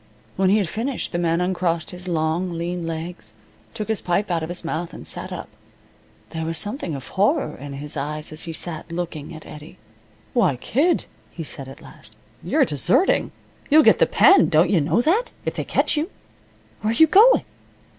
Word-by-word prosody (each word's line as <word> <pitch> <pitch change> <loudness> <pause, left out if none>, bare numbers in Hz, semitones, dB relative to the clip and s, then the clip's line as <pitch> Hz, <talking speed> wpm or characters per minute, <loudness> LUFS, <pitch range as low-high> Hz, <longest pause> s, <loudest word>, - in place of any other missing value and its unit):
When 190 0 +2
he 205 - +4
had 200 -4 0
finished 235 +8 -3
the 175 - -2
man 170 0 +1
uncrossed 175 -3 -1
his 180 0 -8
long 170 +2 -1
lean 170 0 -3
legs, 160 -9 -6 0.4
took 215 - -4
his 220 -2 -1
pipe 185 +3 0
out 170 -1 0
of 160 - -4
his 175 -1 -3
mouth, 165 +1 -4
and - - -10
sat - - -4
up. - - -6 0.8
There 160 0 -4
was 165 0 -2
something 205 - -3
of 135 - -8
horror 215 +11 +1
in 140 +1 -8
his 145 +2 -7
eyes 150 +2 -4
as 155 0 -4
he 165 - -5
sat, 165 0 -2
looking 170 -4 -5
at 155 - -11
Eddie. 150 +4 -11 0.6
"Why, 190 - +3
kid," 285 - +1 0.2
he 165 - -7
said, 140 -3 -6
at 135 - -12
last. - - -15 0.3
"You're - - +3
deserting! 160 - +2 0.4
You'll 310 +1 +7
get - - +5
the - - +5
pen, 390 - +6
don't 165 +2 +4
you 175 -6 +3
know 160 +10 +2
that, 400 - +1 0.2
if - - -1
they - - -3
catch - - +1
you? 310 +4 -1 0.7
Where 215 +1 0
you 320 - +7
going?" 420 +10 +6
175 Hz, 195 wpm, -22 LUFS, 160-210 Hz, 0.8 s, You'll